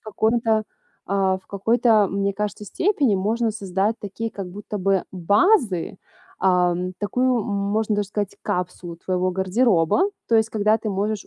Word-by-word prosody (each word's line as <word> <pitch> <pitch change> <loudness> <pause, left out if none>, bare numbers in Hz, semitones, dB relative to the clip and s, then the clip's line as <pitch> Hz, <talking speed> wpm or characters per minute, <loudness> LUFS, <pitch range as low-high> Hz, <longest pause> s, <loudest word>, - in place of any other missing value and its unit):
каком 220 +2 0
то 220 -1 +2 0.4
а, 195 -1 +1
в 190 - -16
какой 200 +4 0
то, 220 -5 +4
мне 200 +1 -1
кажется, 210 +1 -4
степени, 280 - +1
можно 220 +4 0
создать 200 0 -1
такие 220 +3 -5
как 195 -3 -6
будто 205 +2 -6
бы 195 0 +1
базы, 200 - +2 0.4
ам, 180 -1 +1
такую, 250 +4 +1
м, - - -5
можно 205 +1 -1
даже 205 -1 -1
сказать, 205 -1 -4
капсулу 180 -1 -4
твоего 185 +1 -1
гардероба. 190 - +2 0.2
То 230 - +2
есть, 220 0 +3
когда 215 0 +2
ты 220 - -4
можешь 205 +1 -2
205 Hz, 160 wpm, -22 LUFS, 190-220 Hz, 0.4 s, то